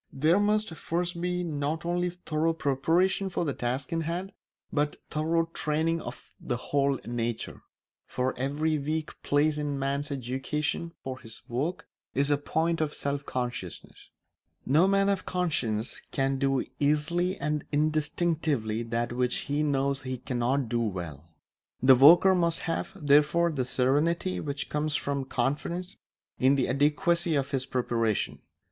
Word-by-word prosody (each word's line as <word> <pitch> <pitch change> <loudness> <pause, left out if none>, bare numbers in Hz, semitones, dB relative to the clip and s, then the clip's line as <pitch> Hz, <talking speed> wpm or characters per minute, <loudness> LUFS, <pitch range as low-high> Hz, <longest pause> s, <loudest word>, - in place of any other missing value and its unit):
There 155 +7 +3
must 210 -2 +1
first 170 +1 -2
be 180 0 -1
not 155 0 -2
only 175 +1 0
thorough 165 -2 -1
preparation 165 +7 +1
for 175 - -1
the 140 - -1
task 130 +5 -2
in 165 - 0
hand 175 +4 -3 0.4
but 145 0 +1 0.2
thorough 165 +2 +1
training 160 +2 0
of 120 - -9
the 120 - -2
whole 140 +1 0
nature; 120 -1 -3 0.5
for 130 +1 -1
every 150 +4 0
weak 155 +2 -3
place 150 +1 +2
in 150 - -2
a 140 -1 -2
man's 140 +1 -1
education 140 +5 -2
for 130 -1 -5
his 115 -2 -8
work 140 +9 -2 0.3
is 140 +2 +2
a 145 - +3
point 160 +3 0
of 150 -1 -1
self 140 0 -3
consciousness. 120 -8 -5 0.6
No 155 +8 +4
man 195 0 +3
of 200 -2 0
conscience 125 -11 -1
can 135 0 0
do 135 -1 +1
easily 165 +6 +1
and 150 0 -1
instinctively 150 -6 0
that 120 +1 -2
which 125 0 0
he 145 +1 -1
knows 140 -1 +1
he 130 -1 -4
cannot 125 +1 -1
do 120 0 0
well. 85 -7 -4 0.5
The 130 0 +9
worker 165 +9 +8
must 170 -2 +1
have, 165 - -2
therefore, 150 +4 +4
the 135 -5 -1
serenity 150 +9 +1
which 140 -1 -4
comes 150 0 0
from 140 -1 -1
confidence 170 +8 -2 0.4
in 130 +2 +5
the 135 - +1
adequacy 155 +4 +2
of 140 -1 0
his 130 -1 -1
preparation. 115 -4 0
145 Hz, 150 wpm, -28 LUFS, 130-165 Hz, 0.6 s, The